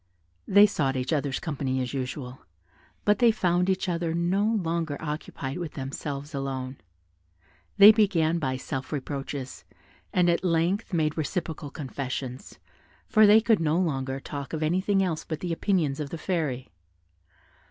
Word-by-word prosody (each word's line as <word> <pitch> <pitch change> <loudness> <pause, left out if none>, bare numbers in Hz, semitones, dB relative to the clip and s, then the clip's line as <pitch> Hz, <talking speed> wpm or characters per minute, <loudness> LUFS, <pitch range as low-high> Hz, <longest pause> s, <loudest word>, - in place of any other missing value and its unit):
They 200 +1 +7
sought 140 -9 0
each 130 +4 -1
other's 140 -3 -1
company 135 -5 -2
as 125 0 -3
usual, 130 -1 -5 0.7
but 210 0 +3
they 240 - +6
found 180 -3 +1
each 190 +1 0
other 170 -2 -1
no 175 +4 +1
longer 170 -8 -1
occupied 150 -2 -5
with 170 -3 -5
themselves 140 +2 -5
alone: 135 -1 -4 1.0
they 205 +1 +11
began 175 -7 +2
by 130 -4 -1
self 130 +1 -5
reproaches, 140 -2 -5 0.5
and 180 -1 +3
at 170 +1 +2
length 180 +5 +1
made 160 -2 0
reciprocal 160 -1 -3
confessions, 130 -2 -6 0.5
for 215 -1 +5
they 215 +2 +7
could 225 -2 +3
no 160 0 +1
longer 135 -6 -1
talk 140 +1 -7
of 160 -1 -2
anything 190 +5 +2
else 165 -4 -2
but 160 -1 -5
the 175 0 -2
opinions 165 -6 0
of 145 -2 -3
the 165 - -5
Fairy. 155 -8 -2
160 Hz, 150 wpm, -27 LUFS, 135-180 Hz, 1.0 s, they